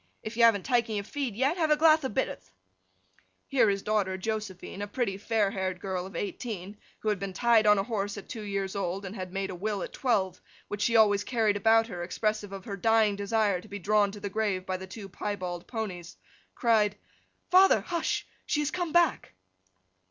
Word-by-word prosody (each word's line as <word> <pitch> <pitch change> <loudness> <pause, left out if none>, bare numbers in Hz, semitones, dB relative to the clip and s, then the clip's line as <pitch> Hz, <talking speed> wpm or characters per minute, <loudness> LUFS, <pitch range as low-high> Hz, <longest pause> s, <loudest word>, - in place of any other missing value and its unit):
If 220 +1 -6
you 235 - 0
haven't 215 -5 +5
took 240 -3 +2
your 210 -2 -2
feed 260 0 -4
yet, 270 - +1
have 320 -3 +1
a 300 - +4
glath 315 0 +5
of 260 -6 -3
bitterth.' 95 - -2 1.0
Here 245 -6 +3
his 195 -1 -1
daughter 205 -3 0
Josephine—a 205 -1 -4
pretty 215 -2 -1
fair 205 0 0
haired 185 -2 -3
girl 185 -1 -3
of 195 - -12
eighteen, 205 -1 -5 0.2
who 215 - 0
had 210 -2 0
been 195 0 -4
tied 225 +1 +4
on 210 0 +6
a 195 - +1
horse 205 -2 -3
at 200 - -9
two 230 - -6
years 195 -2 -3
old, 195 0 -2
and 195 +3 -6
had 185 -3 -6
made 195 0 -3
a - - -6
will 205 +1 -2
at - - -7
twelve, 190 -8 0 0.3
which 205 0 -4
she 230 +2 +2
always 205 -2 +5
carried 220 -4 +1
about 225 +2 +4
with - - -14
her, 175 -4 -5
expressive 210 +2 -2
of 195 -1 -8
her 200 -2 -5
dying 220 0 +3
desire 200 -2 +1
to - - -15
be 205 - -6
drawn 205 +1 +2
to 205 - -9
the 200 - -4
grave 200 -2 -1
by 185 - -2
the 190 0 -9
two 200 +1 -8
piebald 180 -3 -5
ponies—cried, 210 +1 -2 0.6
'Father, 375 +2 +6
hush! 340 -2 -2 0.2
she 295 - +1
has 295 0 -1
come 350 -2 -2
back! 345 - +2
205 Hz, 205 wpm, -28 LUFS, 195-225 Hz, 1.0 s, on